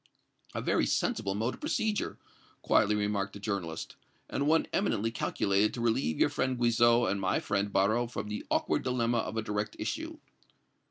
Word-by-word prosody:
"A - - -2
very - - +2
sensible 95 0 0
mode 115 +4 -1
of - - -11
procedure," 220 -8 -1 0.5
quietly 105 +1 +3
remarked 105 -1 -1
the 100 - -8
journalist, 95 -6 -4 0.3
"and 140 - 0
one 160 +1 +4
eminently 115 - +1
calculated 105 -2 +1
to 120 - -4
relieve 110 -10 +1
your - - +4
friend 130 -3 -1
Guizot 120 0 +4
and 100 0 -2
my 95 0 +1
friend 100 0 -1
Barrot 110 +5 +2
from 120 - -5
the 105 0 -4
awkward - - +1
dilemma 120 -2 +1
of 110 0 -3
a 110 - 0
direct 105 0 -3
issue." 320 +1 -4
110 Hz, 170 wpm, -30 LUFS, 100-120 Hz, 0.5 s, one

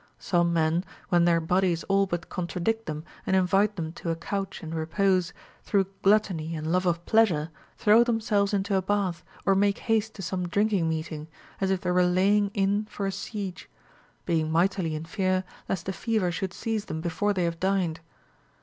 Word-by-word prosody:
Some 170 -1 +1
men, 165 +1 +2 0.3
when 175 -1 +4
their 170 -1 +4
bodies 175 0 +1
all 195 0 +2
but 175 -2 -3
contradict 180 +6 -2
them 155 0 -4 0.2
and 190 - +1
invite 195 +3 +3
them 160 -3 -4
to 170 - -3
a 165 - +1
couch 195 +3 -4
and 160 0 -6
repose, 180 +2 +1 0.3
through 195 -2 +1
gluttony 190 -6 +2
and 155 +1 -3
love 185 +1 +2
of 170 0 0
pleasure 175 -9 +3 0.3
throw 220 +3 +6
themselves 220 -4 +1
into 200 0 0
a 190 - +3
bath 190 -3 -1 0.2
or 195 - +5
make 200 +1 +2
haste 220 -1 0
to 195 - -7
some 180 0 -2
drinking 200 -2 +1
meeting, 155 -1 -4 0.3
as 195 - 0
if 190 -1 0
they 180 - -1
were 180 0 +4
laying 195 +3 +3
in 200 +1 +1
for 205 -1 -5
a 195 - 0
siege; 200 -1 -6 0.6
being 160 -2 0
mightily 170 -1 +1
in 155 +1 -5
fear 185 +1 0 0.3
lest 185 -3 -2
the 190 - -2
fever 215 -3 0
should 185 +2 -3
seize 220 +1 -3
them 160 - -4
before 175 +5 0
they 185 -3 0
have 170 -1 -2
dined. 185 -4 0
185 Hz, 185 wpm, -27 LUFS, 170-200 Hz, 0.6 s, throw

